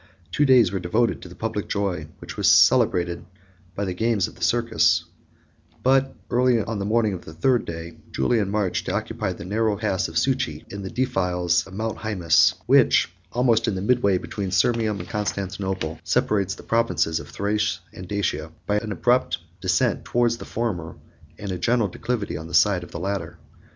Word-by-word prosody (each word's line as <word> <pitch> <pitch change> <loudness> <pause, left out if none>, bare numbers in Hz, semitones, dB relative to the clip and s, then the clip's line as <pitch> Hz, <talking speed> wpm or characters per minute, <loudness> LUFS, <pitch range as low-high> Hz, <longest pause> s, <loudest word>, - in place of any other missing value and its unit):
Two 145 - +2
days 125 -8 +5
were 95 - -2
devoted 110 +7 0
to 90 - -10
the 90 - -12
public 110 +1 -3
joy, 95 -6 -2
which - - -9
was - - +4
celebrated 85 -1 +4 0.5
by 100 - -2
the 95 - -2
games 110 -1 +1
of - - -12
the - - -18
circus; 115 +6 +2 0.8
but, 135 +1 +3 0.2
early 125 -1 +3
on 110 0 -3
the 100 - -2
morning 110 -1 +2
of 90 - -6
the 80 - -11
third 125 +8 +2
day, 85 0 -7
Julian 100 - +1
marched 100 -3 -1
to - - -1
occupy - - -2
the 85 - -8
narrow 105 +2 0
pass 95 -4 0
of 80 - -11
Succi, 130 +3 0
in 100 - -5
the 95 - -5
defiles 90 -10 0
of 95 - -11
Mount 110 +1 -3
Hæmus; 90 -8 +3
which, - - +4 0.2
almost 115 -2 +2
in 105 - 0
the 95 - -3
midway 105 -4 +3
between 95 +1 -4
Sirmium 105 +3 +1
and - - -7
Constantinople, 95 -5 -3
separates 100 -2 +1
the - - -13
provinces 115 -8 +1
of - - -10
Thrace 105 +1 -1
and 90 - -9
Dacia, 90 -6 -2
by 105 0 +1
an 110 0 -6
abrupt 120 -4 +1 0.2
descent 90 -2 +1
towards 120 -1 +1
the - - -9
former, 95 -9 -3 0.4
and 100 -2 -5
a 90 - -4
gentle 115 +2 +2
declivity 110 +3 -3
on 80 - -8
the 85 - -4
side 95 -4 +4
of - - -11
the - - -7
latter. 100 0 -3
100 Hz, 185 wpm, -24 LUFS, 90-115 Hz, 0.8 s, days